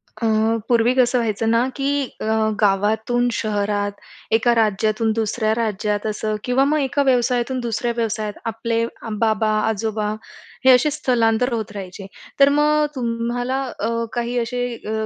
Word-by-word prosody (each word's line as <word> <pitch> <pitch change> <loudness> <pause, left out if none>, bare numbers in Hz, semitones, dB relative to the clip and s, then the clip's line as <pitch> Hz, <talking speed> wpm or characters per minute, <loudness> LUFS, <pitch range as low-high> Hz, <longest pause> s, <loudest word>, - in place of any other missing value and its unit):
अ, 230 - -4 0.4
पूर्वी 240 0 +3
कसं 250 -1 +3
व्हायचं 225 -1 -1
ना 235 +2 +3
की 275 0 -1 0.3
अ, - - -3 0.4
गावातून 220 +5 +2
शहरात, 205 -2 -1 0.4
एका 230 +2 +3
राज्यातून 215 0 +1
दुसऱ्या 220 0 0
राज्यात 210 -2 -1
असं 215 0 -2
किंवा 255 +2 +2
मग 305 +2 +2
एका 280 0 0
व्यवसायातून 250 -1 +1
दुसऱ्या 235 0 -2
व्यवसायात 215 -2 -2 0.2
आपले 230 +1 -1 0.3
बाबा, 220 -1 +2 0.2
आजोबा 215 -1 -1 0.5
हे 260 - +8
असे 255 +4 +4
स्थलांतर 250 -4 +1
होत 220 -2 -3
राहायचे. 195 -1 -8 0.3
तर 275 0 +7
मग 300 +1 +3
तुम्हाला 245 +2 -2 0.2
अ, 220 - -1 0.2
काही 240 0 -2
असे 245 +1 -2
अ, 220 0 -4
230 Hz, 140 wpm, -21 LUFS, 215-245 Hz, 0.5 s, हे